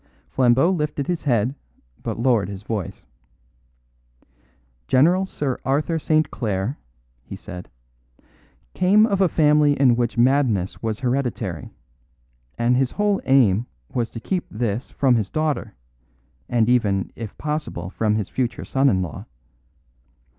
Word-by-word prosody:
Flambeau 130 +6 +3
lifted 150 -5 -2
his 175 0 -3
head, 120 -2 +1 0.5
but - - -4
lowered 115 -5 +2
his 100 0 -8
voice. 105 - -5 1.8
"General 175 +8 +3
Sir 140 -8 -3
Arthur 150 +4 0
St. 155 0 +1
Clare," 105 +3 -2 0.4
he - - -9
said, 90 0 -9 1.0
"came 205 +4 +4
of 200 -3 0
a 190 - +4
family 150 -2 +3
in 130 -4 +5
which 120 0 -1
madness 120 -7 +2
was 110 -2 -3
hereditary; 120 - -2 0.9
and 120 +1 +2
his 130 0 +1
whole 205 -1 +1
aim 120 -5 +3 0.3
was 120 -2 -1
to 115 - -8
keep 180 +9 -3
this 110 +2 -3
from 130 -4 +2
his 105 -4 -2
daughter, 150 - -2 0.7
and 115 -2 +2
even, 105 -6 +1
if 110 -3 -8
possible, 150 - -4
from 105 0 0
his 105 -3 -2
future 120 -3 -3
son 135 +1 +2
in 95 -6 +1
law. 85 - -7
125 Hz, 130 wpm, -22 LUFS, 110-150 Hz, 1.8 s, in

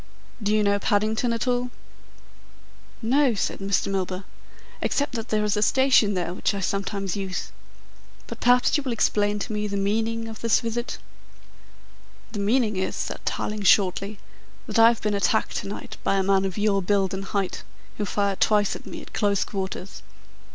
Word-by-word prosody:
"Do 205 0 0
you 215 - +3
know 200 0 +2
Paddington 215 +4 +1
at 230 +1 -2
all?" 245 0 +1 1.3
"No," 260 +1 +3
said - - -2
Mr. 195 0 0
Milburgh, 190 0 -2 0.6
"except 285 - 0
that 230 0 -4
there 215 -1 +1
is 210 0 +1
a 210 - 0
station 255 -4 +4
there 175 -1 -2
which 200 - -1
I - - -2
sometimes 195 0 -2
use. 190 -2 -4 0.7
But - - -8
perhaps 245 0 +4
you 295 - +2
will 260 -4 -2
explain 210 -2 +1
to 215 +2 -4
me 210 0 -1
the 200 -1 -2
meaning 225 +3 -1
of 220 -1 -8
this 230 -1 +3
visit?" 235 +1 -3 1.3
"The 215 - -5
meaning 215 0 +1
is," 190 - -1
said - - -4
Tarling 210 0 -2
shortly, 195 +1 +3 0.5
"that - - -1
I 225 - +9
have 235 -1 +1
been 210 -1 +1
attacked 200 -3 +1
to - - -4
night 200 - -7
by - - +2
a 195 - +2
man 195 0 +2
of 190 0 -3
your 205 -1 +2
build 195 0 +1
and 195 +1 -4
height, 195 -1 -2 0.4
who 210 - 0
fired 200 0 -1
twice 210 -2 +3
at - - -10
me - - -7
at - - -15
close 200 -2 +1
quarters. 190 -1 -5
205 Hz, 180 wpm, -25 LUFS, 195-225 Hz, 1.3 s, I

